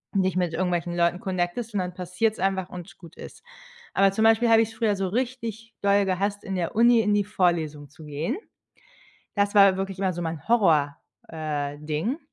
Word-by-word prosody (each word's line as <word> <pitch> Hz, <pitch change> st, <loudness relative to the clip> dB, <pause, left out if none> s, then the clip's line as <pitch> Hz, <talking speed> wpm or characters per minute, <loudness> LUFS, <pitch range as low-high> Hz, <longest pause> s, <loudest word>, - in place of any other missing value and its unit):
dich 185 Hz, -2 st, +1 dB
mit 175 Hz, -3 st, 0 dB
irgendwelchen 175 Hz, -1 st, -1 dB
Leuten 170 Hz, +1 st, +1 dB
connectest 190 Hz, +5 st, -3 dB
und 200 Hz, -, 0 dB
dann 180 Hz, -1 st, -3 dB
passiert's 180 Hz, +5 st, -1 dB
einfach 190 Hz, -1 st, -1 dB
und 180 Hz, -2 st, -10 dB
gut 170 Hz, -2 st, -14 dB
ist. -, -, -11 dB, 0.5 s
Aber 195 Hz, 0 st, +4 dB
zum 220 Hz, +3 st, 0 dB
Beispiel 225 Hz, +1 st, +4 dB
habe 225 Hz, 0 st, +6 dB
ich's 225 Hz, 0 st, -2 dB
früher 220 Hz, -2 st, 0 dB
so 195 Hz, -1 st, -2 dB
richtig 230 Hz, 0 st, -4 dB
doll 200 Hz, 0 st, +3 dB
gehasst, 200 Hz, +2 st, -1 dB
in 195 Hz, -2 st, -4 dB
der 175 Hz, +1 st, -3 dB
Uni 235 Hz, +1 st, +5 dB
in 210 Hz, 0 st, +1 dB
die 205 Hz, -1 st, +2 dB
Vorlesung 165 Hz, -7 st, -1 dB
zu 155 Hz, +2 st, -14 dB
gehen. 150 Hz, -, -3 dB, 1.0 s
Das 205 Hz, 0 st, +1 dB
war 195 Hz, -2 st, +6 dB
wirklich 195 Hz, 0 st, -4 dB
immer 190 Hz, -2 st, 0 dB
so 175 Hz, +1 st, -5 dB
mein 160 Hz, -3 st, -5 dB
Horror, 160 Hz, -11 st, +3 dB, 0.3 s
äh, 150 Hz, -3 st, -4 dB
Ding, 155 Hz, -, -2 dB
190 Hz, 190 wpm, -25 LUFS, 170-210 Hz, 1.0 s, habe